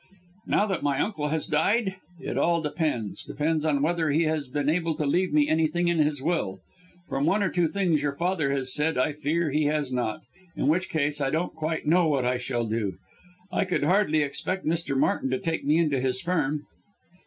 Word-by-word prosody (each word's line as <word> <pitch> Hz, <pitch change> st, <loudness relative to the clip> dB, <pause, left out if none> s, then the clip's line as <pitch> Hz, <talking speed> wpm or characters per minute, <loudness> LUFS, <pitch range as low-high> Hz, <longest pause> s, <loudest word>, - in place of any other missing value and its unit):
"Now 205 Hz, -, +3 dB
that 190 Hz, -4 st, -2 dB
my 140 Hz, -1 st, 0 dB
uncle 155 Hz, -5 st, -1 dB
has 155 Hz, +1 st, -1 dB
died? 190 Hz, +6 st, +1 dB, 0.2 s
It -, -, -4 dB
all 170 Hz, 0 st, +2 dB
depends 145 Hz, -, -2 dB
depends 155 Hz, +1 st, -1 dB
on 145 Hz, -3 st, +1 dB
whether 165 Hz, 0 st, +1 dB
he 155 Hz, +3 st, +3 dB
has 155 Hz, -3 st, -1 dB
been 145 Hz, +2 st, -2 dB
able 165 Hz, 0 st, +1 dB
to 150 Hz, -1 st, -2 dB
leave 180 Hz, +6 st, +1 dB
me 150 Hz, -1 st, +3 dB
anything 160 Hz, +2 st, +1 dB
in 170 Hz, -1 st, +1 dB
his 150 Hz, -3 st, +1 dB
will. 140 Hz, -, -1 dB, 0.5 s
From 140 Hz, +3 st, -1 dB
one 200 Hz, +4 st, +2 dB
or 190 Hz, -, +1 dB
two 175 Hz, -2 st, +2 dB
things 170 Hz, -4 st, +1 dB
your 145 Hz, -1 st, -1 dB
father 170 Hz, -4 st, 0 dB
has 130 Hz, -2 st, 0 dB
said 150 Hz, +2 st, +1 dB
I 140 Hz, +4 st, +1 dB
fear 155 Hz, +2 st, -1 dB
he 150 Hz, +1 st, +1 dB
has 150 Hz, -2 st, 0 dB
not 120 Hz, -4 st, -2 dB, 0.3 s
in -, -, -1 dB
which 180 Hz, +5 st, +1 dB
case 150 Hz, -1 st, -1 dB
I 135 Hz, -, +1 dB
don't 160 Hz, +5 st, -1 dB
quite 160 Hz, 0 st, -3 dB
know 170 Hz, +2 st, +4 dB
what 140 Hz, -5 st, +1 dB
I 125 Hz, 0 st, +1 dB
shall 120 Hz, -1 st, -2 dB
do. 110 Hz, -3 st, -2 dB, 0.6 s
I 180 Hz, -, +1 dB
could 185 Hz, -5 st, -1 dB
hardly 155 Hz, -2 st, +3 dB
expect 150 Hz, +7 st, -3 dB
Mr. 160 Hz, -4 st, 0 dB
Martin 205 Hz, -, +1 dB
to -, -, 0 dB
take 165 Hz, -4 st, -2 dB
me 150 Hz, +2 st, +3 dB
into 150 Hz, -5 st, +2 dB
his 130 Hz, -1 st, 0 dB
firm." 150 Hz, -3 st, -1 dB
155 Hz, 210 wpm, -26 LUFS, 140-170 Hz, 0.6 s, know